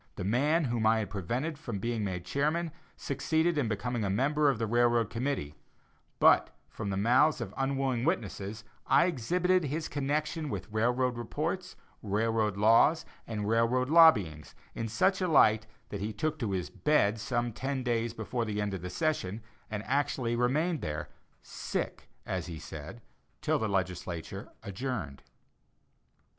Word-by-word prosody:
The - - -5
man 145 - +2
whom 120 -4 +1
I 110 +1 +4
had 105 -4 -3
prevented 125 - -3
from 120 -10 -4
being 115 +2 -2
made 90 -3 -3
chairman, 155 - 0 0.3
succeeded 160 +5 0
in 145 -6 +1
becoming 115 +2 -2
a 100 - 0
member 145 +8 +2
of 135 - +1
the 115 - -1
railroad 120 0 +2
committee; 120 - -2 0.6
but, - - +5 0.2
from 105 -2 -5
the 95 - -1
mouths 125 +9 +4
of - - -5
unwilling 135 -3 0
witnesses, 105 -2 -2 0.2
I - - +5
exhibited 180 +4 +1
his 155 +3 -2
connection 150 +2 -2
with 115 - -5
railroad 120 +3 +1
reports, 160 +10 -3 0.3
railroad 110 0 0
laws, 115 +10 +5 0.2
and 105 -3 -3
railroad 115 +4 +2
lobbyings, 105 - +5 0.2
in 115 - -3
such 190 - +2
a 185 - +1
light 110 -9 +4 0.2
that 100 - -5
he 105 +2 -2
took 155 +8 -2
to 115 -6 -1
his 95 -2 -2
bed 115 -8 +2
some 120 +1 -1
ten 130 +2 -3
days 120 -1 -1
before 115 +2 -2
the 105 -2 -3
end 105 -1 -1
of 95 - -4
the 90 - -5
session, 115 - -1 0.3
and 105 -1 -4
actually 135 -3 0
remained 150 +7 +1
there, 75 0 -4 0.3
"sick," - - -4 0.2
as - - -3
he 85 -2 -6
said, 80 +8 -9 0.4
till - - +1
the 110 - -1
legislature 95 +1 -3
adjourned. 100 - -4
120 Hz, 155 wpm, -30 LUFS, 105-145 Hz, 0.6 s, but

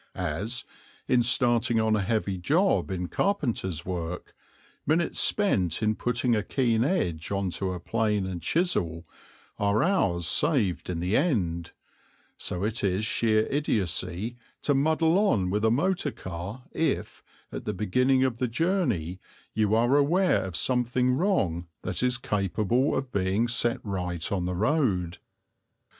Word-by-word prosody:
As, 105 +11 -3 0.4
in 125 -1 +4
starting 120 -1 +3
on 110 0 +2
a 105 - 0
heavy 100 -2 -1
job 165 - +2
in 90 -2 -3
carpenter's 115 - -1
work, 90 -1 -5 0.5
minutes 165 +3 +1
spent 100 - +2
in 110 0 +2
putting 120 +1 0
a 105 - +1
keen 115 0 +1
edge 90 - -1
on 100 -2 -1
to 95 0 -2
plane 105 +2 0
and 90 -2 -5
chisel 85 - 0 0.5
are 100 +1 +2
hours 100 - +1
saved 105 - +2
in 85 -2 -3
the 90 +5 0
end, 85 - 0 0.6
so 90 +1 -3
it 110 +1 -2
is 100 +2 +1
sheer 110 0 +2
idiocy 105 - -1 0.3
to 145 - +2
muddle 160 +5 +2
on 100 - +2
with 105 +2 0
a 110 - +4
motor 160 +6 +1
car 95 +7 -7
if, 165 - -2 0.3
at - - -6
the - - -1
beginning 125 +6 +2
of 130 -3 0
the 125 - 0
journey, 120 - -1 0.3
you 110 0 +2
are 120 +4 +3
aware 175 +6 +3
of 95 -3 -6
something 125 +5 +1
wrong 110 - 0 0.2
that - - -2
is 125 0 +1
capable 110 +4 0
of 135 -1 -4
being 100 +3 +1
set 120 0 +1
right 90 -5 -3
on 95 -3 -1
the 90 0 -2
road. 100 - 0
110 Hz, 145 wpm, -27 LUFS, 90-130 Hz, 0.6 s, in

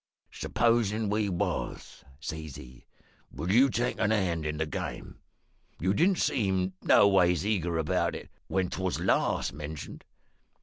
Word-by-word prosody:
"`Supposin' 110 -3 +1
we 105 -1 +1
was,' 90 -2 -3 0.2
says 80 -1 -6
he, 65 -1 -13 0.5
`would 85 +7 -2
you 130 +6 +6
take 120 0 -1
a - - +2
hand 90 -7 0
in 75 0 -3
the 80 - 0
game? 75 - -6 0.6
You 95 +3 +1
didn't 180 - +3
seem 95 - 0
noways 90 -3 +4
eager 90 -6 0
about 80 -2 0
it - - -9 0.2
when 95 -2 0
'twas 95 -1 -2
last - - +1
mentioned.' 75 0 -7
95 Hz, 135 wpm, -29 LUFS, 80-105 Hz, 0.6 s, you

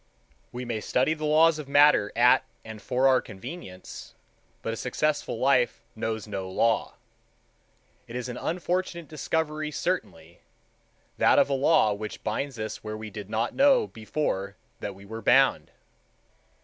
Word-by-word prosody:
We 125 +1 -6
may 115 -3 -3
study 130 +8 +1
the 155 -1 -5
laws 155 +1 +4
of 145 -2 -8
matter 145 -7 +5
at - - +5 0.2
and 110 -1 -9
for 130 +4 +2
our 130 -1 +4
convenience, 95 - -10 0.5
but 115 - -2
a - - -3
successful 145 +2 -1
life 130 -1 +2
knows 110 -1 -3
no 95 -3 -5
law. 115 +4 +1 1.1
It 115 - -9
is 125 0 -3
an 125 0 -6
unfortunate 175 0 -2
discovery 155 +1 -2
certainly, 150 - -4 0.8
that - - +5
of - - +4
a - - +2
law 135 -5 +3
which 105 +1 -7
binds 125 +4 -3
us 110 0 -5
where 110 0 -5
we 110 -1 -8
did 105 -1 -8
not 115 +2 -1
know 270 -4 +4
before 110 - -3 0.2
that 100 - -5
we 100 +1 -14
were 110 +2 -7
bound. 135 +5 +3
125 Hz, 150 wpm, -27 LUFS, 110-150 Hz, 1.1 s, matter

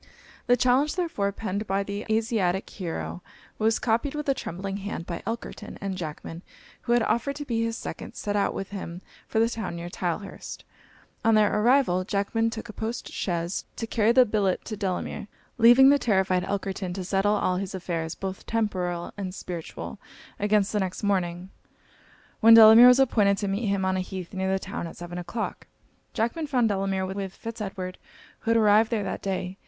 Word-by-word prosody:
The 245 0 +5
challenge, 255 +5 +3
therefore, 325 - -1
penned 205 0 -4
by 195 +1 0
the 200 +1 -5
Asiatic 220 -4 +1
hero, 85 - -5 0.4
was 220 +1 +3
copied 235 +5 0
with 300 -1 -4
a 275 - +4
trembling 195 -3 -5
hand 200 -4 -5
by 170 -1 -5
Elkerton; 225 -2 -6
and 195 -1 -3
Jackman, 165 -1 -6 0.4
who 240 - 0
had 240 -1 +4
offered 235 +6 0
to 290 +1 -6
be 230 -4 -1
his 230 0 -2
second, - - -7
set 205 0 -3
out 200 -1 +1
with 195 0 -5
him 185 -3 -6 0.2
for - - -3
the 225 +1 +4
town 220 -6 -4
near 170 +1 -6
Tylehurst. 180 +3 -5 0.6
On 225 -1 +4
their 210 -1 +4
arrival, 215 -4 +3
Jackman 210 +3 0
took 225 0 -6
a 215 - -9
post 225 +3 -4
chaise 170 0 -2
to 230 - -3
carry 225 0 +2
the 255 +1 +6
billet 205 -4 0
to 215 - -4
Delamere, 195 0 -3 0.3
leaving 240 +4 +8
the 285 0 +5
terrified 190 -5 +2
Elkerton 195 -2 -3
to 190 - -4
settle 195 +3 +1
all 185 -3 +1
his 190 0 -4
affairs, 170 -3 -3
both 190 -1 -6
temporal 180 -6 -2
and 190 -2 -5
spiritual, 175 -4 -7 0.4
against 210 -1 +2
the 210 - +1
next 190 0 -3
morning, 185 -2 -1 0.9
when 225 0 +8
Delamere 225 +2 +10
was 250 +1 +7
appointed 210 -7 +3
to 200 - -2
meet 200 +3 -1
him 195 -1 0
on 190 0 +1
a - - 0
heath 185 -1 -6
near 190 0 -1
the 190 - +2
town, 190 -3 -5
at - - -11
seven 175 0 -6
o'clock. 220 +6 -5 0.5
Jackman 235 +8 -1
found 250 -5 +2
Delamere 195 -1 0
with 190 0 -5
Fitz 230 -1 -7
Edward, 185 -2 -5 0.4
who - - -5
had 230 - +4
arrived 215 0 +5
there 220 -3 0
that 190 - -4
day. 190 -1 -3
200 Hz, 190 wpm, -26 LUFS, 185-225 Hz, 0.9 s, Delamere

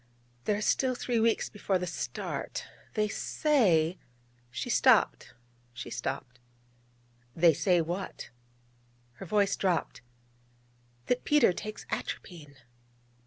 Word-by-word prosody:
There 205 - +1
are - - -4
still 255 +2 +2
three 240 -1 -1
weeks 225 0 +2
before 200 -2 -1
the 180 - -3
start. 170 - -4 0.3
They 215 -1 +2
say...' 190 - +2 0.5
She 120 - -4
stopped, 120 - +3 0.4
she 125 -1 -7
stopped. 125 +1 -4 1.0
'They 165 0 +6
say 170 +3 +3
what?' 175 -4 -5 0.9
Her 195 - -6
voice 200 +1 +2
dropped: 180 -5 -1 1.0
'That 250 0 0
Peter 295 -10 +4
takes 215 +4 -7
atropine.' 150 -6 -5
185 Hz, 110 wpm, -30 LUFS, 160-215 Hz, 1.0 s, They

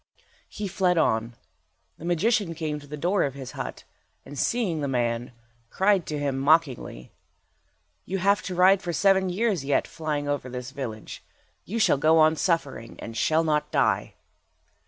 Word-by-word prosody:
He 210 - -5
fled 180 -2 +1
on. 115 -5 +1 0.6
The 165 - -8
magician 185 +1 +1
came 155 -2 -3
to 145 - -14
the 150 +1 -7
door 180 +6 +1
of 135 -1 -1
his 135 -2 -7
hut, - - -6 0.4
and 145 - -10
seeing 185 - 0
the 140 - -1
man, 120 -2 -1 0.4
cried 195 -2 +2
to 150 - -3
him, 140 -2 -1
mockingly— 140 - +1 0.9
"You 195 - -2
have 200 +2 +2
to 185 - -4
ride 185 +2 +5
for 175 -2 -3
seven 190 +2 +3
years 195 -3 0
yet, 140 0 +1
flying 150 -2 -3
over 145 -3 -2
this 125 +1 -6
village. 120 -6 -7 0.4
You 220 - -4
shall 220 -10 +4
go 160 +2 +4
on 155 0 +5
suffering, 150 -9 -1
and 115 - -8
shall 160 +6 +2
not 150 -2 0
die." - - +1
155 Hz, 165 wpm, -26 LUFS, 135-185 Hz, 0.9 s, ride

